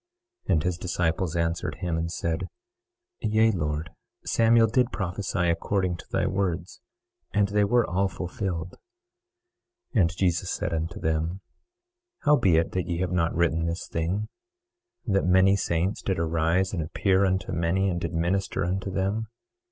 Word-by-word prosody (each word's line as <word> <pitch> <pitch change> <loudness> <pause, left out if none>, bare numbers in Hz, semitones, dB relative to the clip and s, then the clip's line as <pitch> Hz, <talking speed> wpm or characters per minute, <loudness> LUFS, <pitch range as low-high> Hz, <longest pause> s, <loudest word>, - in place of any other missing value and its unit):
23:10 - - +3
And 80 -3 +2
his 90 -2 -1
disciples 85 -1 -1
answered 85 0 -1
him 85 -2 -2
and 80 +1 -2
said: 80 -1 -2 0.7
Yea, 110 +1 +3
Lord, 75 -4 -2 0.3
Samuel 115 0 +4
did 125 +3 +2
prophesy 95 -1 -1
according 90 +2 0
to - - -13
thy - - 0
words, 90 -3 -2 0.5
and 100 -1 +3
they 105 +1 +2
were 120 +3 +3
all 95 +3 +1
fulfilled. 90 -1 -4 1.2
23:11 110 - +4
And 85 0 +1
Jesus 90 -2 +1
said - - -2
unto 80 +1 -3
them: 80 +4 -1 0.8
How 150 - +5
be 95 - +3
it 80 - +1
that 90 -1 -2
ye 85 - -1
have 90 -1 -1
not 85 -2 +1
written 85 -1 +1
this 85 +2 -3
thing, 90 +6 -2 0.8
that 100 -4 +2
many 95 +2 +5
saints 90 +1 -1
did 95 - -1
arise 85 +3 +1
and 85 - -1
appear 95 +5 +1
unto 95 0 0
many 90 +3 +1
and 85 -2 -1
did 85 - -2
minister 85 +2 0
unto 95 +2 -2
them? 100 +4 -1
90 Hz, 160 wpm, -26 LUFS, 85-95 Hz, 1.2 s, How